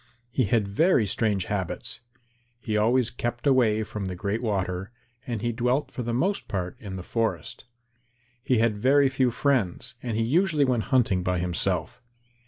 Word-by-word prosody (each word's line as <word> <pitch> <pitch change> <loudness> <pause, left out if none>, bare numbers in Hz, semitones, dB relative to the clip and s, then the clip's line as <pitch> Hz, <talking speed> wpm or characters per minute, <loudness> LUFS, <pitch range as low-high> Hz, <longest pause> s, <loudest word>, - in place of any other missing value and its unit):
He 130 0 +1
had 105 0 +1
very 125 - +3
strange 100 -2 0
habits. 100 -5 -3 0.6
He 110 -2 -3
always 115 +3 +2
kept 120 +1 -4
away 120 -6 +3
from 105 -2 -5
the 95 -1 -4
Great 100 +5 -2
Water 95 -4 -2 0.4
and 115 -4 -3
he 120 - +1
dwelt 125 +4 0
for - - -5
the 120 0 -2
most 185 +12 0
part 90 -2 -3
in 100 -3 -7
the 90 - -6
forest. 115 +2 -2 0.8
He 130 - +2
had 115 -1 +2
very 135 +4 +4
few 130 -1 +2
friends, 120 -8 0
and 115 -3 -3
he 115 - +2
usually 155 +3 +2
went 125 -4 0
hunting 115 -9 +2
by 90 0 0
himself. 90 +2 -1
115 Hz, 170 wpm, -26 LUFS, 100-125 Hz, 0.8 s, very